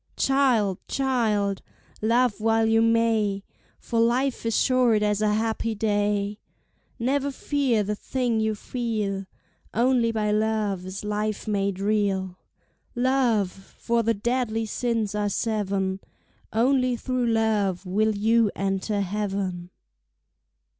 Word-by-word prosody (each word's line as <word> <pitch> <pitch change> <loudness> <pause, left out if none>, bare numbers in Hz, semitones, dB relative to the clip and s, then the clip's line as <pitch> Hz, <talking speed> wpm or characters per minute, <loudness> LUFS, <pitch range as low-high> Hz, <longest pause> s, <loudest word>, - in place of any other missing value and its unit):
Child, 250 -9 +2
child, 220 -7 0 0.4
love 235 +1 +2
while 225 0 +3
you 225 0 +3
may, 225 -3 +2 0.3
For 230 - -2
life 245 +2 +1
is 225 - +1
short 245 -5 +3
as 210 0 +1
a 215 -1 +2
happy 225 0 -1
day; 205 -1 0 0.6
Never 270 +3 0
fear 270 -5 0
the 210 +1 -2
thing 240 +1 -1
you 220 0 0
feel 210 -5 -3 0.5
Only 240 0 +3
by 215 -2 0
love 210 -3 0
is 190 +2 -6
life 210 0 -2
made 200 -2 -1
real; 195 -3 0 0.6
Love, 245 -6 +2
for 230 +5 -3
the 230 0 +1
deadly 225 0 -1
sins 225 -1 -1
are 210 0 0
seven, 195 -3 -1 0.5
Only 255 +2 +2
through 250 0 -1
love 215 -5 +1
will 215 +4 +1
you 220 +1 +3
enter 195 +1 -1
heaven. 195 -3 -3
220 Hz, 120 wpm, -25 LUFS, 200-235 Hz, 0.6 s, while